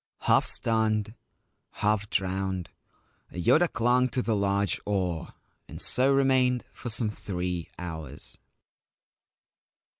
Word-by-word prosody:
Half - - +3
stunned, 110 -2 0 0.6
half 105 0 0
drowned, 95 -1 -1 0.6
Yoda 155 - +3
clung 125 +2 +2
to 125 +1 -1
the 115 - +1
large 100 0 +1
oar, 90 -5 -2 0.3
and - - -9
so 130 +2 +3
remained 130 -2 +3
for 120 - -7
some 115 -1 0
three 90 -4 -4
hours. 80 -6 -8
105 Hz, 100 wpm, -27 LUFS, 95-120 Hz, 0.6 s, Half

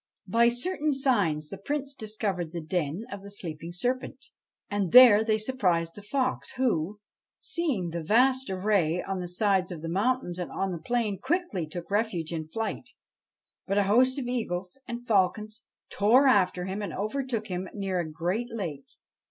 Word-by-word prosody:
By 235 +1 +4
certain 295 +4 0
signs 200 - +1
the 195 - -7
Prince 280 +5 -3
discovered 205 - -3
the 170 - -3
den 165 +4 -2
of 200 -1 -6
the 200 - -10
sleeping 170 -4 -7
serpent, 245 +9 -3 0.4
and 200 -4 -1
there 240 -4 +9
they 220 -1 +2
surprised 180 -8 0
the 205 - -10
fox, 255 +5 -2
who, 210 -7 0 0.4
seeing 250 - -1
the 170 0 -3
vast 255 +8 +3
array 185 -3 +1
on 195 -1 -3
the 180 - -4
sides 190 0 +1
of 165 -3 -7
the - - -3
mountain 205 +2 0
and 180 - -3
on 195 0 -2
the 170 -3 -5
plain, 225 -1 -1
quickly 260 - -1
took 175 +4 -7
refuge 200 -6 -1
in 160 -2 -4
flight. 220 +7 -4 0.8
But 195 +1 0
a 205 - +4
host 250 +7 +4
of 270 - -3
eagles 220 -4 -3
and 240 0 -6
falcons 215 +1 0 0.2
tore 235 +7 +4
after 185 -8 +3
him 190 +2 -4
and 205 - -4
over 215 +8 -2
took 235 -4 -3
him 185 -2 -4
near 195 -3 -2
a 165 -2 -3
great 185 +10 -2
lake. 165 -11 -5
205 Hz, 175 wpm, -28 LUFS, 180-240 Hz, 0.8 s, there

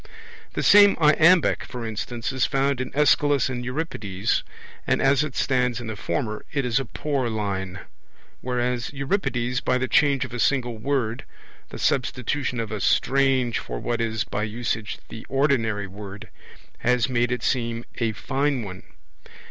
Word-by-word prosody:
The - - -2
same 205 -1 +7
iambic, 160 +2 +5
for 125 -3 -6
instance, 115 +3 -4
is 130 -1 +1
found 135 -2 +1
in 130 - -4
Aeschylus 145 -3 +3
and 125 -1 -4
Euripides, 120 - -2 0.5
and - - +2
as 135 +1 +3
it 150 -4 -5
stands 125 -3 +1
in 120 - -7
the 110 -1 -4
former 105 +3 -3
it 140 -3 -1
is 125 +1 +2
a 135 - -3
poor 135 +1 -2
line; 95 -4 -3 0.6
whereas 125 -1 -1
Euripides, 135 -5 -1
by 125 - +1
the 130 0 -1
change 140 -3 +3
of - - -10
a 125 - -4
single 120 -3 +1
word, 120 -2 -1 0.5
the - - -8
substitution 130 0 -1
of 110 -2 -3
a 105 -2 -3
strange 135 -3 +2
for - - -6
what 120 - -2
is 110 -1 -1
by 105 - -4
usage 110 0 -3
the 115 - -8
ordinary 125 -7 +1
word, 100 +1 -9 0.5
has 120 -2 +2
made 120 -1 +1
it 125 - -2
seem 115 -2 -1
a 115 -2 +1
fine 135 +3 -1
one. 95 -3 -8
125 Hz, 160 wpm, -24 LUFS, 110-135 Hz, 0.6 s, same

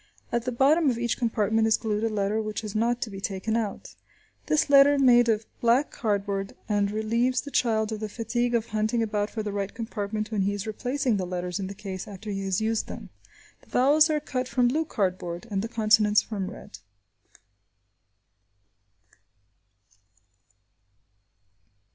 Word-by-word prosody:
At 235 0 -1
the 250 - -1
bottom 285 +5 +4
of 240 - -1
each 235 -1 0
compartment 220 -1 +1
is 220 - +4
glued 215 -1 -2
a 225 - +1
letter 210 +1 0
which 215 +1 -4
is 210 -2 -5
not 235 +2 0
to 220 - -7
be 195 0 -8
taken 200 +2 -2
out. 215 -4 -3 0.5
This 305 0 +2
letter 285 0 +7
is 280 - +1
made 240 -2 +6
of 220 0 +1 0.2
black 240 +5 +3
cardboard 200 -2 -2
and 205 -2 +1
relieves 230 +4 0
the 285 - -9
child 220 -4 +1
of 215 - -4
the 215 0 -4
fatigue 240 +2 -1
of 230 0 -1
hunting 220 +2 0
about 210 -1 -1
for 220 - -4
the 210 - -3
right 200 -1 -3
compartment 215 -2 -4
when 210 -3 0
he 200 +1 0
is 205 0 -5
replacing 245 +2 -1
the 185 -2 -3
letters 180 0 -3
in 190 - -3
the 200 - -7
case 195 -2 -6
after 205 +1 -7
he 195 -1 -3
has 190 -1 0
used 220 0 -1
them. - - -9 0.5
The - - -24
vowels 295 +5 +4
are 305 -1 +1
cut 260 -3 -3
from 245 0 +2
blue 315 +5 0
cardboard, 185 - -2
and 195 -1 0
the 225 - -3
consonants 215 -2 +3
from 195 -4 -4
red. 205 - -11
220 Hz, 175 wpm, -26 LUFS, 205-240 Hz, 0.5 s, letter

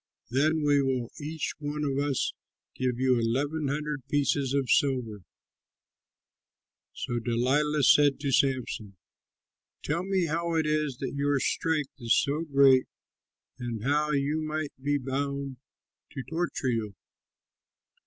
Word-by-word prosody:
Then 155 +4 +2
we 145 -1 +4
will 130 -3 -1
each 155 +1 -3
one 150 0 -3
of 140 -1 0
us 140 -2 0 0.4
give 125 -2 -1
you 130 -2 +3
eleven 140 +7 0
hundred 150 0 -2
pieces 140 -2 +1
of 140 -2 +1
silver." 125 -8 +1 1.7
So 120 -1 -3
Delilah 135 +6 +1
said 145 +2 +5
to 140 -2 -1
Samson, 125 -7 0 0.9
"Tell 150 +4 -1
me 190 -2 +1
how 170 +1 -1
it 160 -1 +2
is 150 -4 0
that - - -3
your 140 0 +1
strength 155 0 -1
is 115 -1 +2
so 145 +3 +1
great 135 -2 +6 0.7
and 120 -3 -4
how 150 +3 +1
you 150 +2 0
might 155 -1 -3
be 145 +1 +1
bound 140 0 -3 0.6
to 135 -3 -5
torture 165 -4 -2
you?" 110 -4 -2
140 Hz, 130 wpm, -28 LUFS, 130-150 Hz, 1.7 s, great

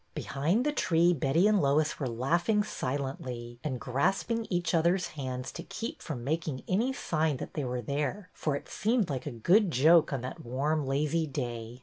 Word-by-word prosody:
Behind 170 - 0
the 295 - +2
tree 175 - +3
Betty 160 +5 +3
and 210 -2 +4
Lois 150 +2 +2
were 135 -4 -1
laughing 170 - +1
silently, 125 - -4
and 135 -5 -2
grasping 195 - 0
each 175 -2 0
other's 175 +3 +2
hands 130 -3 -5
to 170 - -7
keep 240 - -6
from 130 -7 -5
making 155 -1 -2
any 225 +8 +1
sign 155 - 0
that - - -7
they 150 - -2
were 125 -1 -3
there, 145 - -3
for 150 -3 -1
it 140 - -6
seemed 220 -5 0
a 135 - -1
good 175 - +3
joke 160 +3 +5
on 135 -3 -2
that 130 +1 -6
warm, 140 +4 -1
lazy 150 +4 +1
day. 120 -3 -5
150 Hz, 180 wpm, -30 LUFS, 130-175 Hz, -, joke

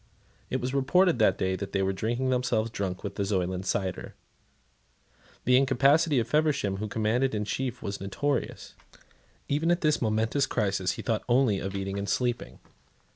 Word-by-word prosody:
It - - -1
was 125 +2 -3
reported 145 +3 +3
that 100 -3 +4
they 95 +1 -1
were 95 0 0
drinking 120 +6 -1
themselves 120 -3 0
drunk 95 -4 -4
with - - -6
the 100 - 0
Zoyland 95 -1 -1
cider. 95 -1 -2 1.3
The 125 +1 +5
incapacity 135 +4 +3
of 115 -2 +1
Feversham, 140 -8 +1
who 110 +2 -3
commanded 110 +4 0
in 105 0 -1
chief, 125 +2 -3
was 100 -1 -4
notorious. 130 +8 -3 0.7
Even 150 +4 0
at 175 0 +2
this 155 -1 +2
momentous 115 +5 +1
crisis 95 -6 0
he - - -7
thought 115 -3 0
only 120 -5 +3
of 95 +1 -5
eating 95 0 -3
and 100 0 -4
sleeping. 120 +1 -1
115 Hz, 160 wpm, -28 LUFS, 100-135 Hz, 1.3 s, The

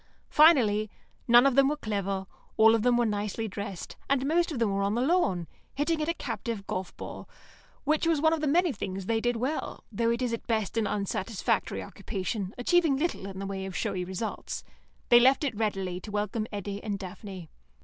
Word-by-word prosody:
Finally, 230 -10 +5 0.4
none 240 +2 +7
of 275 - +4
them 275 +1 +5
were 300 +1 0
clever, 200 -5 -2 0.3
all 220 0 +7
of 225 - +2
them 245 +1 +3
were 240 - +3
nicely 210 +1 -2
dressed, 200 -2 -6
and 270 -1 +2
most 340 +4 +2
of 295 - -3
them 230 -3 +1
were 200 - 0
on 200 +2 +1
the 240 - +1
lawn, 200 - +1 0.3
hitting 310 +3 0
at 305 - -1
a - - +2
captive 230 -6 -4
golf 185 -2 -4
ball, - - -8 0.5
which 310 +2 +1
was 325 -3 +3
one 315 +2 +4
of 320 - -1
the 305 - 0
many 345 +4 +3
things 195 -4 -5
they 225 +2 0
did 240 +1 +1
well, 260 +7 -3
though 230 +2 +1
it 235 +2 0
is 240 -2 -1
at 230 - -5
best 220 -3 0
an 225 -2 +1
unsatisfactory 200 0 -1
occupation, 195 -1 -4
achieving 315 +2 +3
little 295 - -2
in 190 -1 -8
the 195 - -4
way 195 -1 -4
of 190 -1 -6
showy 180 - -1
results. 190 +4 -4 0.5
They 240 - +9
left 265 +4 +5
it 275 -5 0
readily 195 -4 -2
to 210 - -10
welcome 210 +1 -2
Eddy 200 0 -5
and 205 -2 -2
Daphne. 190 -2 -8
225 Hz, 205 wpm, -28 LUFS, 195-270 Hz, 0.5 s, They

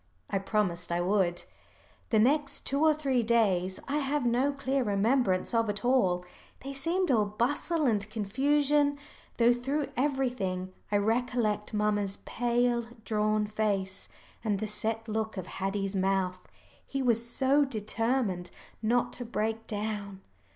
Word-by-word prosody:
I 195 - +1
promised 185 -4 -1
I 170 - +1
would. 175 -1 +1 0.7
The 220 - +3
next 280 +6 +2
two 280 +3 +1
or 315 - +6
three 270 -5 +1
days 195 -5 +2
I 285 +2 0
have 285 -1 0
no 245 +4 +2
clear 275 -1 -1
remembrance 205 -1 +1
of 230 -2 +2
at 205 +2 -3
all. 185 -9 +2 0.4
They 275 +1 -5
seemed 335 +5 0
all 220 -4 +4
bustle 285 +9 0
and 210 -4 +1
confusion 285 +7 +2 0.4
though 240 0 +5
through 275 +5 -2
everything 245 -9 -1 0.2
I 205 - +4
recollect 220 -1 0
mamma's 205 -2 0
pale 240 0 +1 0.2
drawn 215 -1 +1
face, 200 -3 -2 0.3
and 210 -3 +1
the 215 - -2
set 225 +2 -2
look 220 -1 -2
of 185 - -4
Haddie's 195 +1 -3
mouth. 190 -1 +1 0.4
He 275 -1 -3
was 235 -2 +2
so 270 +4 +3
determined 225 -5 -1 0.3
not 235 +2 +1
to 245 - -5
break 225 -1 -2
down. 205 -2 -4
225 Hz, 140 wpm, -29 LUFS, 200-260 Hz, 0.7 s, or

